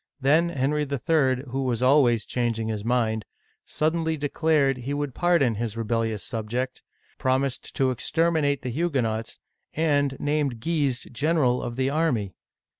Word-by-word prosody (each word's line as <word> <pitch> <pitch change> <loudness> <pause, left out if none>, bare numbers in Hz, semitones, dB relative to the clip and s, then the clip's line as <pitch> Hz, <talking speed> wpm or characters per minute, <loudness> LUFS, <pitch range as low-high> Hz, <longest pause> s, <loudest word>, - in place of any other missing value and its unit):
Then 155 +5 +3
Henry 145 0 0
III. 140 -2 +1
— 135 - -12
who 135 +1 -1
was 125 -2 -1
always 125 -4 +4
changing 115 -2 -1
his 105 -2 -3
mind 110 -2 0 0.3
— - - -42
suddenly 160 +1 0
declared 145 -2 +1
he 130 +3 -4
would 145 -2 -3
pardon 170 -6 +2
his 115 0 -4
rebellious 115 -2 -1
subject, 120 +3 -3 0.4
promised 130 0 -1
to 130 -1 +2
exterminate 150 +1 0
the 125 - -3
Hugue 145 -1 0
nots, 110 0 -3 0.4
and 145 -4 +1
named 145 -5 0
Guise 145 -3 0
general 135 -1 +1
of 120 - -4
the 130 +1 0
army 140 - 0
135 Hz, 150 wpm, -25 LUFS, 120-150 Hz, 0.4 s, always